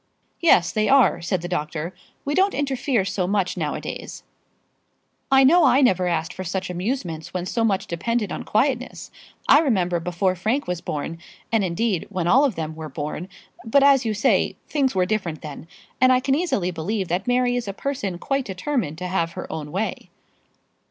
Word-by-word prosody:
"Yes, 250 - +4
they 215 -1 +1
are," 270 -2 +4
said 175 0 -2
the - - -3
doctor. 165 0 -3 0.3
"We 285 - -1
don't 385 +4 +2
interfere 265 -6 0
so 185 -2 -1
much 195 -2 0
now - - -2
a - - -5
days." - - -7 1.1
"I 270 0 +7
know 335 +6 +6
I 270 - +5
never 185 -8 +3
asked 165 -1 -1
for 185 - -6
such 185 +1 -3
amusements 180 - -4
when 180 -1 -2
so 230 +5 -1
much 200 -4 +1
depended 215 +5 -2
on - - -4
quietness. 255 +3 -1 0.4
I - - +7
remember 185 - +1
before 180 +2 0
Frank 220 +10 -1
was 180 -1 -3
born 160 0 -4 0.3
and, 225 -3 +2
indeed, 185 +1 -1
when 185 -4 -2
all 265 +11 +5
of 255 -9 0
them 160 -1 -4
were 160 -1 -7
born 150 +6 -5 0.3
But 275 +5 +3
as 275 -2 +5
you 220 -2 -1
say, 210 - +2
things 275 -7 0
were 185 -1 +3
different 180 -6 -2
then; 150 +1 -8 0.3
and 255 0 +6
I 255 - +5
can 270 +1 0
easily 270 - 0
believe 185 +4 -2
that 180 +5 -1
Mary 245 0 +2
is 245 -3 -2
a - - -2
person 205 -5 -3
quite 275 +7 -1
determined 190 - -2
to 180 +1 -4
have 170 -2 -1
her - - -6
own 150 -2 -6
way." 200 +6 -3
195 Hz, 190 wpm, -23 LUFS, 175-255 Hz, 1.1 s, I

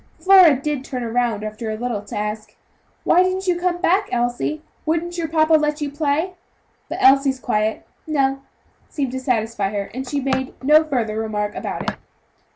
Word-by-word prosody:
Flora 370 -6 +7
did 290 -1 -2
turn 255 -2 -5
round 235 -4 0
after 215 +1 -5
a 215 - -3
little, 235 -3 -3
to 205 - -7
ask: 210 0 -4 0.5
"Why 360 - +4
didn't 370 +1 0
you 355 -2 +1
come 355 0 0
back, 380 +3 +2
Elsie; 245 +6 -1 0.2
wouldn't 335 +2 -1
your 335 -2 -2
papa 315 0 +2
let 300 -1 +2
you 290 -2 -3
play?" 305 +4 -1 0.6
But - - -4
Elsie's 270 0 +5
quiet 215 -2 -1 0.2
"no" 275 -3 +1 0.5
seemed 275 -4 -2
to 260 - -3
satisfy 225 -5 -1
her, 200 -1 -4
and 260 +2 -5
she 285 - -1
made 265 -1 -2
no 305 +3 +6
further 235 -8 -2
remark 210 -2 -2
about - - -5
it. - - -2
270 Hz, 175 wpm, -21 LUFS, 225-315 Hz, 0.6 s, Flora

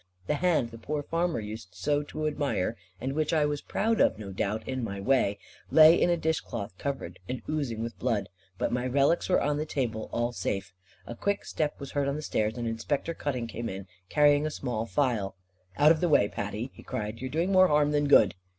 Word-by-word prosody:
The - - 0
hand 150 -7 +1
the 115 - -10
poor 145 +5 -3
farmer 165 0 0
used 105 -3 -8
so 145 +10 +1
to 155 +1 -5
admire, 145 -8 -1 0.2
and 130 +5 -3
which 155 +2 0
I 155 -2 +3
was 145 -1 -2
proud 225 +1 0
of - - +3
no 100 -2 -7
doubt, 105 +3 -2
in 130 -1 -2
my 100 -3 -4
way, 105 -3 +2 0.3
lay 160 0 +8
in - - +4
a 175 - +3
dishcloth 120 - -2
covered 135 -11 -4
and 130 - -4
oozing 135 -8 -2
with 115 0 -6
blood. 110 -6 0 0.3
But - - -1
my 125 +1 0
relics 140 +8 +2
were 185 - +4
on 145 0 0
the 155 - -1
table, 115 -7 -2
all 120 +1 0
safe. 95 -5 -3 0.3
A - - -6
quick 200 +11 -1
step 150 -2 -2
was 140 -1 -7
heard 140 -1 0
on 140 - 0
the 155 - -5
stairs, 110 -4 -1
and 120 -1 -2
Inspector 125 +8 -2
Cutting 135 -6 -3
came 115 +1 -5
in, 95 0 -6 0.2
carrying 145 0 +4
a - - -1
small 115 -6 -3
phial. 115 -9 0 0.4
"Out 150 +2 +7
of 160 - +2
the 175 - +2
way, 100 -9 +5
Patty," 105 +5 -4
he - - -13
cried, 105 +2 -5
"you 130 - -3
are - - -7
doing 165 +7 0
more 185 -1 +6
harm 150 -1 +3
than 145 -1 +2
good." 105 -9 +6
135 Hz, 225 wpm, -28 LUFS, 110-150 Hz, 0.4 s, lay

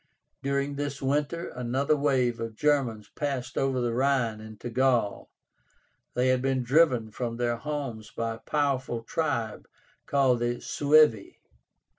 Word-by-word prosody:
During 140 +1 -1
this 145 -1 -3
winter 150 +5 -1
another 130 +5 0
wave 130 -5 +1
of 115 -1 -5
Germans 125 -7 +1
passed 135 -3 -3
over 135 -1 +1
the 120 -1 0
Rhine 125 -4 +1
into 110 +2 -8
Gaul. 125 -4 +1 0.9
They 125 +1 +2
had 130 -1 +2
been 135 -1 0
driven 125 -4 +3
from 115 +1 -4
their 120 -1 0
homes 135 -6 -5
by 115 0 -3
a - - -8
powerful 135 -3 -1
tribe 115 -6 -2 0.4
called 135 -3 +3
the 120 0 -1
SUEVI. 150 -4 +3
130 Hz, 135 wpm, -27 LUFS, 115-140 Hz, 0.9 s, driven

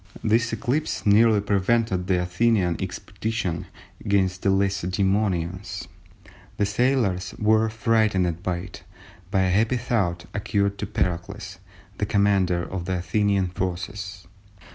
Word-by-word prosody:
This 115 +2 +2
eclipse 125 +7 -1
nearly 105 +1 +5
prevented 100 -1 +1
the 95 -2 +2
Athenian 90 -1 +1
expedition 110 -7 -3 0.4
against 95 -2 +1
the 100 - +1
Lacedæmonians. 95 -1 0 0.7
The 105 - +2
sailors 105 -4 0
were 110 +1 +3
frightened 110 -6 +1
by 90 -1 -1
it, 90 0 -9 0.5
but 95 -1 +2
a 95 - +2
happy 115 +6 +2
thought 100 -8 -1
occurred 100 -1 0
to 105 - -3
Pericles, 95 +1 -3 0.4
the 105 - 0
commander 100 -4 +2
of 90 -1 -5
the 95 0 -1
Athenian 95 +2 +1
forces. 95 +2 -4
100 Hz, 120 wpm, -24 LUFS, 90-110 Hz, 0.7 s, nearly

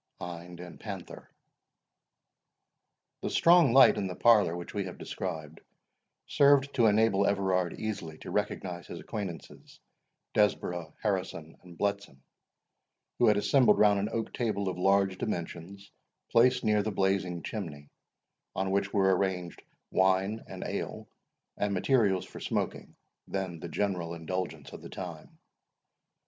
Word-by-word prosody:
HIND 85 0 -8
AND 90 -1 -10
PANTHER. - - -8 1.9
The - - -2
strong 170 -5 +5
light 135 +2 +7
in 95 - -1
the 90 - -5
parlour 105 -8 +4
which 85 - -8
we 100 -2 -2
have 90 - -8
described, 80 -4 -6 0.6
served 140 -1 +4
to 120 -4 +4
enable 105 -2 +3
Everard 95 -3 0
easily 90 -8 -4
to - - -9
recognise 90 -3 -3
his - - -7
acquaintances, 95 -6 -7 0.5
Desborough, 90 -6 0
Harrison, 95 -6 -2
and 90 -2 -14
Bletson, 100 -9 -3 1.0
who 120 - +5
had 105 -1 +5
assembled 115 0 +4
round 105 -1 +5
an 100 +2 -1
oak 115 -1 -3
table 100 -5 -1
of 90 -1 -5
large 95 0 +2
dimensions, 85 +4 -5 0.4
placed 125 +2 +4
near 105 -2 +3
the 105 - -2
blazing 95 -3 0
chimney, 75 -9 -6 0.6
on 95 0 -1
which 100 0 0
were 95 -2 +3
arranged 90 -2 -2 0.3
wine, 95 +3 +2
and - - -7
ale, - - -5 0.5
and 105 -1 0
materials 100 -2 +2
for - - -11
smoking, - - -3 0.3
then 95 -4 -4
the 85 - -7
general 90 -4 -2
indulgence 80 -3 -5
of - - -9
the - - -10
time. - - -8
95 Hz, 135 wpm, -29 LUFS, 90-105 Hz, 1.9 s, light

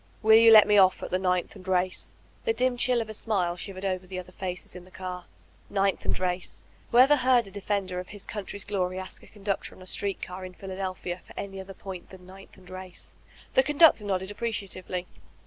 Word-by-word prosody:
'Will 220 +1 +8
you 230 0 +8
let 215 -1 +10
me 210 -1 +6
off 185 -1 +4
at - - -5
Ninth 180 -1 0
and 185 - -13
Race?*' 185 0 0 0.3
The 455 - +2
dim 255 - +1
chill 245 0 +3
of 220 - -6
a - - -7
smile 190 -5 0
shivered 190 +1 -5
over 185 -1 -2
the 185 0 -6
other 180 0 -7
faces 180 -1 -5
in 180 - -9
the 185 - -17
car. 180 -1 -6 0.4
Ninth 195 -1 0
and - - 0
Race! 180 -1 -2 0.3
Who 235 - +1
ever 270 +4 +7
heard 255 -2 +4
a 195 - -10
defender 195 -2 -2
of 180 - -7
his 205 -1 -8
country's 200 -1 -5
glory 185 -2 -1
ask 185 0 -6
a - - -16
conductor 200 -2 -3
on - - -16
a - - -12
street 195 +1 -1
car 185 +1 -6
in 185 0 -8
Philadelphia 185 -2 -5
for - - -16
any 195 -1 -5
other 190 0 -9
point 185 -2 -8
than 185 -1 -13
Ninth 190 +2 -14
and 185 -1 -17
Race! 185 0 -9 0.4
The - - +6
conductor 295 -4 +5
nodded 190 -1 -2
appreciatively. 200 -4 -3
190 Hz, 215 wpm, -27 LUFS, 185-210 Hz, 0.4 s, let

